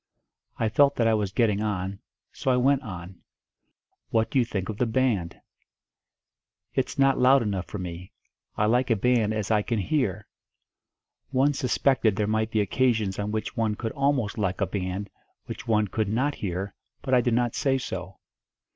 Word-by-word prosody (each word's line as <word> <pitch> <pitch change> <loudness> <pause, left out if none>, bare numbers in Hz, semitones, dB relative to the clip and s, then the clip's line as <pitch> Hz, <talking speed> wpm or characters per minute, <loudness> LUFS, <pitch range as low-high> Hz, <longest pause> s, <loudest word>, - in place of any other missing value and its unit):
I 115 - +1
felt 140 +6 +4
that 115 - +1
I 115 - +4
was 105 -3 0
getting 105 -2 +1
on 100 -2 -2 0.3
so - - -3
I 125 - +4
went 135 +2 +3
on. 90 -5 -9 0.9
"What 115 -1 +1
do 135 - +3
you 120 - +3
think 95 -5 -3
of 110 - -5
the 125 - +1
band?" 110 -8 0 1.3
"It's 130 +3 -1
not 135 -1 +3
loud 130 0 +5
enough 100 -4 -2
for - - -6
me. 90 -1 -7 0.5
I 105 - +2
like 125 +4 +2
a 115 - +4
band 115 0 +2
as 110 -1 -2
I 105 -1 +4
can 115 +2 -2
hear." 105 - -1 1.0
One 140 +2 +2
suspected 130 -5 +2
there 105 - 0
might 110 +1 0
be 110 -1 +1
occasions 110 -3 +1
on 105 0 -2
which 110 0 -3
one 110 -2 0
could 115 +1 -4
almost 135 -7 0
like 95 -2 -1
a 100 - +2
band 95 +1 -4 0.3
which - - -8
one 105 -2 +2
could 105 +1 -1
not 130 +7 +1
hear, 95 -2 -4 0.3
but 130 - -1
I 125 - +6
did 120 -1 +1
not 120 -1 +1
say 135 -1 +1
so. 95 -7 -6
110 Hz, 180 wpm, -26 LUFS, 100-125 Hz, 1.3 s, I